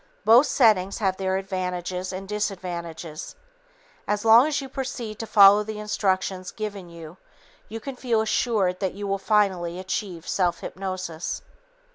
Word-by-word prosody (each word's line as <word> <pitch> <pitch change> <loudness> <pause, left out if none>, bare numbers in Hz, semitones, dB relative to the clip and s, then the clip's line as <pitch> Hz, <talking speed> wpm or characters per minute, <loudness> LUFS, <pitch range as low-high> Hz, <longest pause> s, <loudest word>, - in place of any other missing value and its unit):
Both 240 +6 +7
settings 200 -6 +3
have 190 -4 0
their 190 0 0
advantages 185 -1 -3
and 190 +1 -6
disadvantages. 175 - -5 0.7
As 210 +1 -1
long 230 +5 +7
as 295 -2 0
you 275 - -6
proceed 250 -5 -5
to 225 - -5
follow 200 0 +7
the 215 0 -6
instructions 190 -3 -1
given 205 -4 -6
you, 165 0 -11 0.5
you 225 +2 -5
can 270 +3 -7
feel 235 -3 0
assured 215 -4 0
that 190 -2 -2
you 205 0 -5
will 195 0 -1
finally 190 -5 +1
achieve 185 -2 -4
self 180 -3 0
hypnosis. 185 -3 -5
195 Hz, 145 wpm, -25 LUFS, 180-215 Hz, 0.7 s, Both